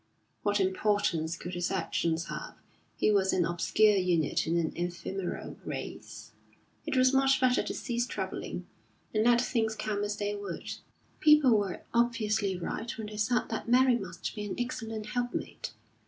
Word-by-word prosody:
What 205 0 +1
importance 185 -4 +1
could 175 +2 -7
his 175 0 -1
actions 170 -3 0
have, - - -6 0.4
who 215 - +4
was 190 -2 +3
an 175 -2 +3
obscure 200 +5 +3
unit 175 -6 +1
in 170 +1 +2
an 165 -2 0
ephemeral 175 +2 -4
race? - - -7 0.6
It - - 0
was 255 +1 +5
much 270 0 +4
better 255 -1 +4
to - - -4
cease 240 -1 -1
troubling, - - -4 0.5
and 215 0 +2
let 240 0 +5
things 225 -3 0
come 210 -1 -2
as 205 0 -2
they 205 0 -1
would. 200 -4 -5 0.5
People 300 -4 +6
were 200 -3 -1
obviously 220 -5 +1
right 220 +6 -4
when 220 - -4
they 210 0 -7
said 230 +4 +1
that 225 +1 -4
Mary 255 +1 +5
must 185 -6 -5
be 210 - -5
an 205 - -4
excellent 225 -3 -3
helpmate. 245 +2 -3
210 Hz, 160 wpm, -30 LUFS, 185-240 Hz, 0.6 s, People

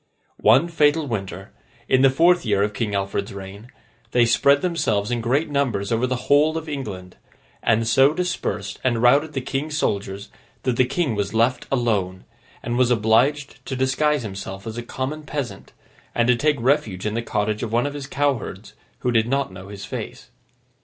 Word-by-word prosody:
One 150 +6 +5
fatal 155 -2 +2
winter, 95 - -5 0.4
in 130 - +3
the 135 - +6
fourth 170 +6 +4
year 100 -3 +1
of 105 +1 -1
King 105 -1 -2
Alfred's 100 0 -2
reign, 100 +4 -10 0.4
they 120 -1 +5
spread 140 +5 +3
themselves 115 - 0
in 120 -1 -1
great 135 +8 +1
numbers 120 -9 0
over 115 +2 +1
the 125 -1 -3
whole 150 +3 +4
of 160 0 -6
England; 105 -11 -6 0.4
and 115 0 +2
so 135 +5 +5
dispersed 165 - -3
and 120 -3 +1
routed 145 +5 +4
the 135 - -2
King's 145 +4 -3
soldiers 100 -5 -2 0.3
that 125 - 0
the 130 - +4
King 140 +1 -1
was 100 0 -2
left 115 +3 +1
alone, 105 -8 0 0.4
and 120 +1 -2
was 125 -1 +4
obliged 125 +6 +1
to 135 - -3
disguise 135 +2 +1
himself 95 -1 -7
as 110 -1 -5
a 120 - -4
common 130 +5 -4
peasant, 145 -4 -6 0.4
and 120 0 +2
to 125 - +6
take 150 +4 +1
refuge 115 -7 0
in 105 - -1
the 115 - -1
cottage 105 -1 -1
of 115 - -3
one 120 +3 +2
of 145 - -3
his 140 -1 -6
cowherds 140 -5 -2 0.3
who 125 - 0
did 115 -1 +2
not 135 -3 0
know 95 +1 -10
his 100 -1 -8
face. - - -7
120 Hz, 185 wpm, -22 LUFS, 105-140 Hz, 0.4 s, the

